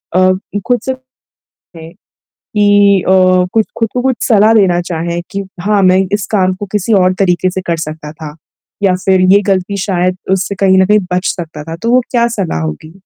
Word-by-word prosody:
अ, 185 +2 +1
खुद 245 -1 +2
से 265 - -1 0.6
कहें 165 -1 -14 0.4
कि 205 -2 +2
अ, - - +3 0.4
कुछ 220 -1 +1
खुद 225 - 0
को 250 - -1
कुछ 260 -1 0
सलाह 215 -1 +4
देना 185 -5 +3
चाहें 170 -1 -4
कि 200 - -4 0.2
हाँ, 205 0 +1
मैं 185 0 +4
इस 205 -2 -1
काम 185 -2 +2
को 205 +2 -7
किसी 210 +1 -1
और 185 0 +2
तरीके 185 -1 +1
से 190 - -4
कर 170 - 0
सकता 155 -1 -8
था, 155 -2 -9 0.5
या 190 -2 +3
फिर 190 -1 +3
ये 200 - +5
गलती 195 0 -1
शायद 185 -2 -1 0.2
उससे 195 +1 -1
कहीं 190 -1 +4
न 190 - +4
कहीं 210 +2 +4
बच 180 +2 -1
सकता 160 -3 -7
था, 165 +1 -7
तो 230 +7 -3
वो 255 - +5
क्या 235 -2 +2
सलाह 165 - -2
होगी। 80 - -6
190 Hz, 200 wpm, -13 LUFS, 175-205 Hz, 0.6 s, ये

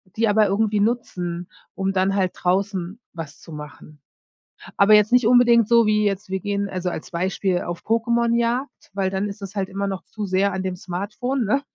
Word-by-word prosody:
die 225 0 +2
aber 210 0 +4
irgendwie 210 +1 +1
nutzen, 180 -6 -2 0.2
um 195 0 -1
dann 190 +1 +1
halt 185 -2 +1
draußen 190 +2 -1
was 160 -3 -8
zu - - -13
machen. 150 0 -11 0.8
Aber 200 +2 +6
jetzt 210 +1 +5
nicht 245 -2 +4
unbedingt 240 -2 +5
so 235 -1 +5
wie 210 0 +2
jetzt, 200 0 -2
wir 190 0 -1
gehen 200 +1 -2
also 185 -1 -2
als 160 - -7
Beispiel 185 +1 -1
auf 175 -1 -5
Pokémonjagd, 235 +3 +1 0.2
weil 195 -1 0
dann 195 +2 -2
ist 200 +1 -8
das 195 +1 -8
halt 195 -1 -1
immer 200 +1 -3
noch 190 -1 -4
zu 210 -1 -6
sehr 195 +1 +1
an 190 0 -3
dem 185 -1 -2
Smartphone, 210 +9 -3
ne? 220 +7 +1
200 Hz, 195 wpm, -22 LUFS, 185-220 Hz, 0.8 s, Aber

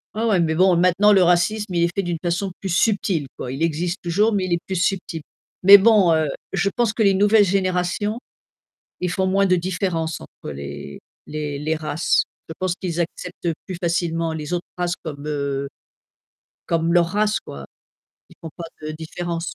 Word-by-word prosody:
Ouais, 220 +2 -1
ouais, 210 -5 +3
mais 160 -1 +1
bon, 185 +1 +4
maintenant 180 +4 +4
le 190 -2 +5
racisme, 180 +4 +1
il 170 -1 +2
est 170 0 0
fait 195 - 0
d'une 175 -2 -2
façon 180 +2 -1
plus 195 - -5
subtile 185 -5 +1
quoi. 125 - -5
Il 140 +4 -2
existe 165 +2 -1
toujours, 205 +6 +2
mais 200 -2 +1
il 185 - -5
est 170 - +1
plus 190 - -3
subtil, 180 -2 -1 0.4
mais 200 +2 +11
bon, 200 -4 +5
heu, 160 -1 +2 0.2
je 195 +1 +1
pense 240 -3 +2
que 220 - -3
les 200 -2 +5
nouvelles 205 +2 +5
générations, 190 +3 0 0.8
ils 180 - -1
font 190 +2 0
moins 195 +1 +3
de 185 -1 +3
différence 175 -2 -2
entre - - -10
les 70 0 -8 0.3
les 150 -1 -4
les 155 +3 -1
races. 155 +1 +1 0.3
Je - - -5
pense 185 -2 0
qu'ils 175 -3 -3
acceptent 175 +1 -4 0.2
plus 185 -2 -6
facilement 165 -1 0
les 150 -1 -6
autres 175 0 -2
races 175 0 -1
comme, 145 -2 -6
heu, 140 -2 -2 1.0
comme 165 0 +1
leur 175 -1 +4
race 210 +4 +1
quoi. 70 -1 -10 0.6
Ils - - -19
font 165 - -7
pas 170 - -7 0.2
de - - -3
différence. 165 +2 -5
175 Hz, 190 wpm, -22 LUFS, 160-195 Hz, 1.0 s, mais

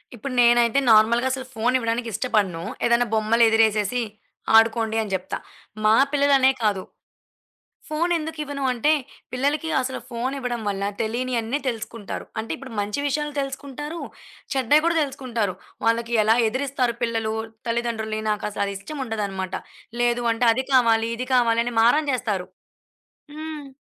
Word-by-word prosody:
ఇప్పుడు 255 +3 -6
నేనైతే 240 +2 +5
నార్మల్‌గా 230 +4 +5
అసలు 260 0 -3
ఫోను 235 +3 +1
ఇవ్వడానికి 230 0 -1
ఇష్టపడను. 200 -7 0 0.2
ఏదైనా 235 0 +3
బొమ్మలు 220 +2 +3
ఎదిరేసేసి, 220 +1 +2 0.5
ఆడుకోండి 225 0 +4
అని 210 - -5
జేప్తా. 190 0 -2 0.5
మా 215 - +6 0.2
పిల్లలనే 275 -2 +4
కాదు. 200 -3 +1 1.1
ఫోను 335 +3 0
ఎందుకు 320 0 -6
ఇవ్వను 280 -1 -4
అంటే, 250 +5 +1 0.4
పిల్లలకి 285 +5 0
అసలు 260 0 -4
ఫోనివ్వడం 250 0 -3
వల్ల 200 -1 -2 0.2
తెలినీ 240 +4 -2
అన్నీ 235 +6 -2
తెలుసుకుంటారు. 225 -3 -5
అంటే, 225 - -8
ఇప్పుడు 255 -2 -10
మంచి 205 +6 -2
విషయాలు 295 +1 -2
తెలుసుకుంటారు, 280 +4 -6 0.5
చెడ్డాయి 270 +3 +4
గూడా 335 0 +2
దెలుసుకుంటారు. 240 -8 -2 0.3
వాళ్ళకి 230 +1 +1
ఎలా 220 +2 +4
ఎదిరిస్తారు 260 0 -1
పిల్లలు, 225 -2 -1 0.3
తల్లిదండ్రులని. 225 -2 -2
నాకసలు 205 -1 -2
ఇష్టం 280 +9 -7
ఉండదన్నమాట. 195 -4 -3 0.5
లేదు 240 0 +1
అంటే 235 +2 +1
అది 260 +3 -1
కావాలి, 230 -3 +4
ఇది 255 +2 -4
కావాలి 235 -2 +3
అని 245 - -4
మారం 295 +6 +4
జేస్తారు. 210 -7 -2 0.9
హ్మ్. 310 -2 -7
235 Hz, 135 wpm, -23 LUFS, 220-265 Hz, 1.1 s, మా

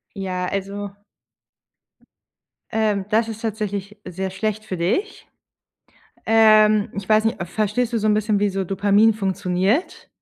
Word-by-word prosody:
Ja, 185 -2 -3
also 200 +1 -5 1.8
ähm, 215 -3 0
das 220 +1 +2
ist 225 -1 -7
tatsächlich 210 -2 -4
sehr 190 +1 -4
schlecht 215 +2 -3
für 190 -4 -5
dich. 210 - -2 1.0
Ähm. 215 -1 +5
Ich 200 -1 -6
weiß 215 0 +4
nicht, 225 +1 -1
äh, 175 - -3
verstehst 215 +5 -1
du 230 - +1
so 215 - -1
'n 210 - +3
bisschen, 215 0 +1
wie 205 +1 +1
so 195 0 -2
Dopamin 200 +4 +3
funktioniert? 195 - -1
210 Hz, 140 wpm, -21 LUFS, 195-220 Hz, 1.8 s, Ähm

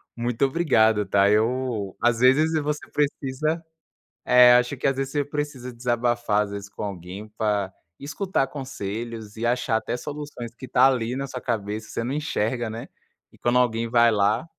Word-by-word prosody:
muito 120 +2 0
obrigado, 110 -9 +3
tá? 100 +1 +3
Eu 110 -2 0
às 120 -1 +2
vezes 150 +6 +4
você 150 0 -3
precisa 150 +2 -1 0.6
eh, 125 0 +7
acho 125 +3 +2
que 135 - 0
às 135 - +1
vezes 135 0 -2
você 145 -1 +1
precisa 145 -3 -4
desabafar, 120 -3 0
às 105 - -7
vezes 100 0 -7
com 100 - -10
alguém, 95 +1 -7
pra 105 -3 0 0.3
escutar 150 0 -1
conselhos 115 -4 -6
e 115 - -2
achar 120 -1 +1
até 115 - -3
soluções, 145 -5 -7
que 130 - -9
está 130 +2 +5
ali 125 -2 0
na 140 +1 -3
sua 125 -1 -7
cabeça, 110 -2 -3
você 115 - -3
não 125 +3 -3
enxerga, 120 -5 -1
né? 115 +2 -7 0.4
E - - -21
quando 120 +1 +2
alguém 115 -1 +1
vai 120 0 +5
lá 105 +6 +1
120 Hz, 175 wpm, -24 LUFS, 110-135 Hz, 0.6 s, eh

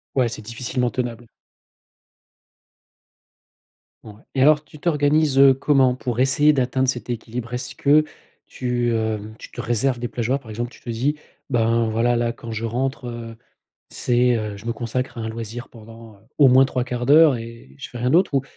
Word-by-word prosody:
Ouais 125 -3 +3
c'est 110 - -7
difficilement 125 +2 -2
tenable. 120 -2 -4 2.8
Ouais, 110 - -10 0.2
et 130 - +3
alors 150 +1 +5
tu 150 - -15
t'organises 150 -3 +2 0.2
comment 130 -4 +3
pour 125 -2 -3
essayer 145 +3 +4
d'atteindre 130 -1 0
cet 120 -2 -2
équilibre? 120 +1 -5
Est-ce 125 +2 -4
que 150 +2 +4 0.4
tu 120 -2 -1
hem, 110 -1 -3
tu - - -11
te - - -8
réserves 120 +2 0
des 120 - -3
plages 120 -1 -4
horaires? 135 - +2
Par 115 - -13
exemple 120 +3 -4
tu - - -17
te - - -13
dis: 130 +6 -1 0.3
«Ben 115 -2 +2
voilà, 120 +2 +1
là 120 0 0
quand 115 -1 -9
je 110 +1 -4
rentre, 125 +2 -2
heu, 115 -1 -7 0.5
c'est, 125 0 +1
heu, 105 -2 -4
je 100 - -12
me 115 - 0
consacre 120 +2 -4
à 115 - -5
un 110 - -3
loisir 115 +2 -7
pendant, 115 -1 -14
heu, - - -24 0.2
au 140 -3 +7
moins 130 +2 +6
3/4 125 -2 -3
d'heure 150 -2 +6
et 115 - -11
je - - -8
fais 120 - -9
rien 125 +2 0
d'autre 175 -3 +3
ou 135 - +2
120 Hz, 185 wpm, -22 LUFS, 115-130 Hz, 2.8 s, au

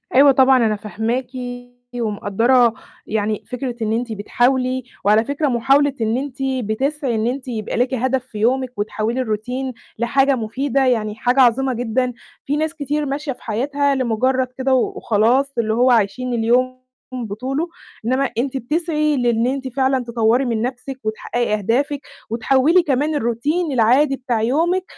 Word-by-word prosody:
أيوه 275 +1 +8
طبعًا، 260 -2 +5
أنا 215 -1 +1
فاهماكِ 220 +4 -3 0.7
ومقدَّرة 230 +2 +2 0.3
يعني 215 0 -1
فكرة 250 -1 -4
إن 220 0 0
أنتِ 235 +1 -2
بتحاولي، 255 +4 0 0.2
وعلى 215 +2 +5
فكرة 285 +3 -1
محاولة 275 +3 +3
إن 225 +2 +1
أنتِ 270 -1 -5
بتسعي 265 +1 -1
إن 220 +1 0
أنتِ 260 +2 -3
يبقى 220 -3 -3
ليكِ 250 +2 +1
هدف 260 0 0
في 220 -4 -10
يومِك 255 +4 +1
وتحوِّلي 215 +4 -1
الروتين 250 +3 -3 0.3
لحاجة 270 +3 +3
مفيدة، 260 +4 -1
يعني 215 -4 0
حاجة 245 +4 +1
عظيمة 260 +2 +3
جدًا. 245 +1 -1 0.3
في 290 +2 0
ناس 315 +1 -1
كتير 295 -1 -2
ماشية 280 +1 -3
في - - -10
حياتها 280 +5 0
لمُجرّد 255 +1 +1
كده 265 0 +1
و 255 - +3
وخلاص، 240 +6 +2
اللي 220 -2 +1
هو 250 +2 +4
عايشين 235 +3 +1
اليوم 250 +3 +1 0.3
بطوله، 255 - -3 0.4
إنّما 260 +2 +1
أنتِ 265 +2 -1
بتسعي 305 +2 0
لإن 240 -1 +1
أنتِ 265 0 -2
فعلًا 260 0 0
تطوّري 235 +2 +1
من 230 -2 -1
نَفْسِك 255 +2 -4
وتحقّقي 220 +2 -2
أهدافِك 260 +8 0 0.3
وتحوِّلي 270 +9 +3
كمان 295 +1 0
الروتين 290 +7 -1
العادي 260 +4 +3
بتاع 250 -4 -2
يومِك 330 +10 +1
255 Hz, 150 wpm, -20 LUFS, 230-270 Hz, 0.7 s, أيوه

